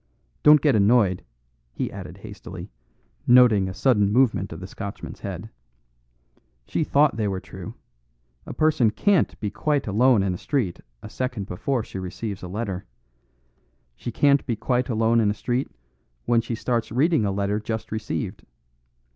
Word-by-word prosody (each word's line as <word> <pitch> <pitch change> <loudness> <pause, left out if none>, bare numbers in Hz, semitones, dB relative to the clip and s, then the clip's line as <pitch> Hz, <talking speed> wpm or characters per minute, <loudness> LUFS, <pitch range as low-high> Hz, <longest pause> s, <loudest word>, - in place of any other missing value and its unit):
Don't 150 -1 +7
get 145 -4 +3
annoyed," 100 -3 +3 0.5
he - - -3
added - - -8
hastily, - - -9 0.6
noting 120 -6 +6
a - - -5
sudden 105 -2 +3
movement 115 -5 +2
of 80 - -7
the 95 - -7
Scotchman's 100 +1 -7
head; - - -6 1.1
"she - - -1
thought 145 -4 +3
they 110 -2 0
were 95 -2 -2
true. - - -9 0.7
A - - -5
person 155 -7 +3
can't 195 - +1
be 105 -2 -3
quite 145 +4 0
alone 110 +1 +3
in 95 -2 0
a 90 - -6
street 125 - -1 0.2
a 105 - -8
second 125 -6 -3
before 115 +7 -2
she 95 - -7
receives 95 +2 -5
a 90 - -6
letter. 100 -1 -4 1.1
She 120 - -6
can't 140 +3 +3
be 120 - 0
quite 125 +4 -1
alone 115 0 +2
in 105 -2 +3
a 105 - -1
street 125 +4 -1 0.6
when 120 -1 +3
she 115 0 -4
starts 115 -1 -2
reading 150 +3 +2
a 100 - 0
letter 100 +1 -1
just 110 0 -5
received. 110 -1 -4
110 Hz, 160 wpm, -24 LUFS, 100-130 Hz, 1.1 s, Don't